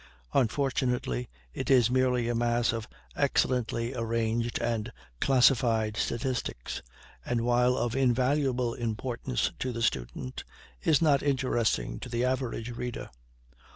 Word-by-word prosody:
Unfortunately 125 Hz, -, 0 dB, 0.2 s
it 130 Hz, -, -4 dB
is 125 Hz, -3 st, +5 dB
merely 125 Hz, -2 st, +2 dB
a 120 Hz, -, 0 dB
mass 120 Hz, 0 st, +1 dB
of 115 Hz, -1 st, -4 dB, 0.3 s
excellently 120 Hz, -1 st, +1 dB
arranged 115 Hz, 0 st, -1 dB
and 115 Hz, -1 st, -1 dB, 0.3 s
classified 120 Hz, -4 st, +3 dB
statistics, 120 Hz, -, -2 dB, 0.4 s
and 120 Hz, -1 st, -1 dB
while 125 Hz, +1 st, +3 dB
of 120 Hz, 0 st, -1 dB
invaluable 130 Hz, -1 st, +2 dB
importance 115 Hz, -, -2 dB
to 130 Hz, -, -1 dB
the 115 Hz, -1 st, -3 dB
student, 65 Hz, -, -2 dB, 0.4 s
is 155 Hz, +1 st, +3 dB
not 145 Hz, -3 st, +4 dB
interesting 120 Hz, -, 0 dB
to -, -, -7 dB
the 120 Hz, +1 st, 0 dB
average 125 Hz, -2 st, -2 dB
reader. 120 Hz, -, -5 dB
120 Hz, 120 wpm, -29 LUFS, 115-130 Hz, 0.4 s, is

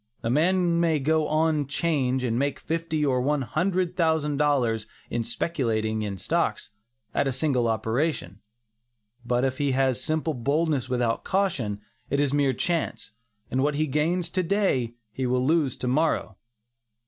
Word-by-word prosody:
A 115 Hz, -, 0 dB
man 170 Hz, +3 st, +2 dB
may 165 Hz, -2 st, +3 dB
go 155 Hz, +2 st, +1 dB
on 155 Hz, -2 st, +1 dB
"'change" 135 Hz, -4 st, 0 dB
and 120 Hz, -1 st, 0 dB
make 140 Hz, 0 st, 0 dB
fifty 160 Hz, -1 st, -2 dB
or 130 Hz, -3 st, +2 dB
one 145 Hz, +1 st, +1 dB
hundred 180 Hz, +5 st, 0 dB
thousand 160 Hz, -4 st, +1 dB
dollars 125 Hz, -7 st, +1 dB, 0.2 s
in 120 Hz, -, 0 dB
speculating 110 Hz, -5 st, -1 dB
in 100 Hz, -2 st, -3 dB
stocks, 90 Hz, -, -1 dB, 0.4 s
at 140 Hz, -, +1 dB
a -, -, +1 dB
single 130 Hz, -2 st, +1 dB
operation. 110 Hz, -, -1 dB, 0.8 s
But 125 Hz, +1 st, +1 dB
if 130 Hz, -1 st, -2 dB
he 140 Hz, -2 st, +1 dB
has 130 Hz, -1 st, +1 dB
simple 160 Hz, 0 st, -1 dB
boldness 140 Hz, +1 st, 0 dB
without 120 Hz, -2 st, 0 dB
caution, 140 Hz, -, -1 dB, 0.3 s
it 140 Hz, -, +1 dB
is 145 Hz, -1 st, +1 dB
mere 140 Hz, -2 st, +2 dB
chance, 170 Hz, -3 st, -2 dB, 0.4 s
and 130 Hz, -, +1 dB
what 145 Hz, +1 st, +1 dB
he 155 Hz, +2 st, +1 dB
gains 165 Hz, +5 st, 0 dB
to 185 Hz, -, +1 dB
day 165 Hz, -, 0 dB, 0.2 s
he 130 Hz, +3 st, -2 dB
will 125 Hz, +1 st, +1 dB
lose 150 Hz, -3 st, +2 dB
to 125 Hz, -, -4 dB
morrow. 135 Hz, -6 st, +1 dB
140 Hz, 160 wpm, -26 LUFS, 125-160 Hz, 0.8 s, may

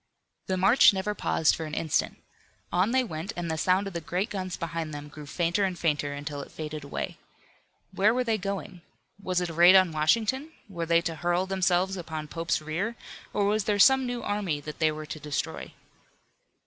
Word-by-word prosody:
The 185 Hz, -, 0 dB
march 200 Hz, +5 st, +6 dB
never 195 Hz, +2 st, -2 dB
paused 160 Hz, -6 st, +2 dB
for 160 Hz, -, -5 dB
an 150 Hz, -, -5 dB
instant. 160 Hz, -3 st, -1 dB, 0.5 s
On 180 Hz, +4 st, +2 dB
they 260 Hz, +1 st, +2 dB
went, 175 Hz, -1 st, -5 dB
and 170 Hz, -2 st, -3 dB
the -, -, -1 dB
sound 185 Hz, +5 st, +2 dB
of 195 Hz, -, -6 dB
the 170 Hz, -, -3 dB
great 180 Hz, +6 st, -2 dB
guns 185 Hz, -3 st, -4 dB
behind 165 Hz, -2 st, -4 dB
them 145 Hz, 0 st, -8 dB
grew 150 Hz, 0 st, -10 dB
fainter 175 Hz, +6 st, 0 dB
and 185 Hz, -2 st, -1 dB
fainter 145 Hz, -4 st, 0 dB
until 145 Hz, 0 st, -5 dB
it -, -, -11 dB
faded 155 Hz, -1 st, -6 dB
away. 140 Hz, -, -5 dB, 0.7 s
Where 205 Hz, +3 st, +4 dB
were 250 Hz, +2 st, +1 dB
they 225 Hz, -3 st, 0 dB
going? 195 Hz, -2 st, -5 dB, 0.4 s
Was 185 Hz, -2 st, 0 dB
it 175 Hz, -, -2 dB
a -, -, -8 dB
raid 175 Hz, +3 st, +7 dB
on 185 Hz, -3 st, +6 dB
Washington? 230 Hz, -, +1 dB
Were 170 Hz, -4 st, -5 dB
they 170 Hz, 0 st, +4 dB
to 165 Hz, -1 st, -3 dB
hurl 175 Hz, +2 st, +1 dB
themselves 190 Hz, 0 st, +1 dB
upon 155 Hz, -3 st, -6 dB
Pope's 165 Hz, -1 st, -1 dB
rear, 185 Hz, +10 st, -2 dB, 0.4 s
or 205 Hz, -, +1 dB
was 210 Hz, 0 st, +1 dB
there 205 Hz, -1 st, +1 dB
some 265 Hz, +5 st, +6 dB
new 245 Hz, -1 st, -4 dB
army 200 Hz, -7 st, -1 dB
that 150 Hz, +1 st, -8 dB
they 160 Hz, -1 st, +3 dB
were 155 Hz, 0 st, -6 dB
to 155 Hz, +1 st, -7 dB
destroy? 150 Hz, 0 st, -4 dB
175 Hz, 200 wpm, -27 LUFS, 155-200 Hz, 0.7 s, raid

